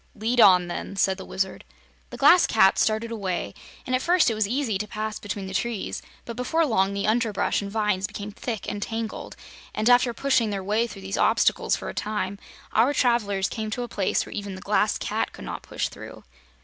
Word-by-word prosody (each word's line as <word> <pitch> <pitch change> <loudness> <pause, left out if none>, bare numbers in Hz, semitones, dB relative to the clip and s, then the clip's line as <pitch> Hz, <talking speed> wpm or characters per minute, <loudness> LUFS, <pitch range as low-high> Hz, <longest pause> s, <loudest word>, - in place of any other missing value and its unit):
"Lead 230 +3 +2
on, 180 -3 +7
then," 175 +3 -5
said 190 0 +2
the - - -7
Wizard. 190 0 -3 0.5
The - - -8
Glass 360 - +6
Cat 195 -3 +4
started 220 +1 +1
away, 190 - -3 0.3
and 255 - 0
at 255 - 0
first 350 -5 +3
it - - 0
was 215 -2 0
easy 235 -4 -1
to 210 - -3
pass 215 +1 -4
between 200 -1 -5
the 190 - -7
trees; 230 +1 -2 0.2
but 235 - -6
before 320 +7 +1
long 200 -6 +1
the 200 - -1
underbrush 220 -2 +1
and 200 - -5
vines 210 -3 0
became 205 +2 -7
thick 225 0 -5
and 205 0 -4
tangled, 225 +1 -4 0.4
and 215 - 0
after 245 0 +5
pushing 235 -2 +1
their 195 -2 -3
way 215 +4 +1
through 190 - -10
these 95 0 -3
obstacles - - +3
for - - -7
a 65 - -4
time, 200 -2 -3 0.3
our 245 +6 +3
travelers 205 -6 +2
came 220 -2 -4
to 245 +3 -3
a - - -5
place 200 -5 0
where - - -10
even 200 -2 -5
the 190 - -9
Glass - - +1
Cat - - -2
could - - -10
not - - -5
push - - -3
through. - - -11
215 Hz, 215 wpm, -25 LUFS, 195-235 Hz, 0.5 s, on